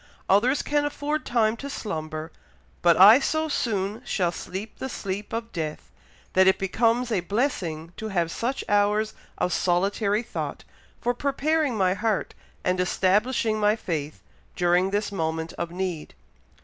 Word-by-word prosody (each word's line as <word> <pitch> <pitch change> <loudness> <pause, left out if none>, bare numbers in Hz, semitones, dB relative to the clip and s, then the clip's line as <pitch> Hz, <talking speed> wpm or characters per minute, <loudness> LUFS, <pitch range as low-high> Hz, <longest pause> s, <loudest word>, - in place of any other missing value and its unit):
Others 240 +8 +3
can 295 0 +1
afford 290 +1 -2
time 225 -2 +2
to 280 - -6
slumber, 155 - -5 0.5
but 170 -2 +5
I 210 +7 +9
so 315 +3 0
soon 210 -6 -1
shall 180 -7 0
sleep 190 +5 -7
the 265 - -4
sleep 200 -3 -5
of 230 0 -4
death, 155 -3 -5 0.4
that 190 0 +5
it 190 - +5
becomes 230 +5 +1
a 210 - +2
blessing 175 - -2
to 220 - -4
have 175 -5 0
such 250 +8 -2
hours 210 +1 +2 0.2
of 180 - 0
solitary 200 +4 +1
thought, - - -5 0.4
for 245 - 0
preparing 280 0 0
my 185 -2 +3
heart 215 0 -1 0.3
and 180 0 +1
establishing 215 +5 +1
my 210 0 +3
faith, 155 -8 -4 0.3
during 180 +1 +3
this 205 +1 -1
moment 160 -3 -2
of 170 - -4
need." 180 -3 -4
205 Hz, 150 wpm, -25 LUFS, 180-235 Hz, 0.5 s, I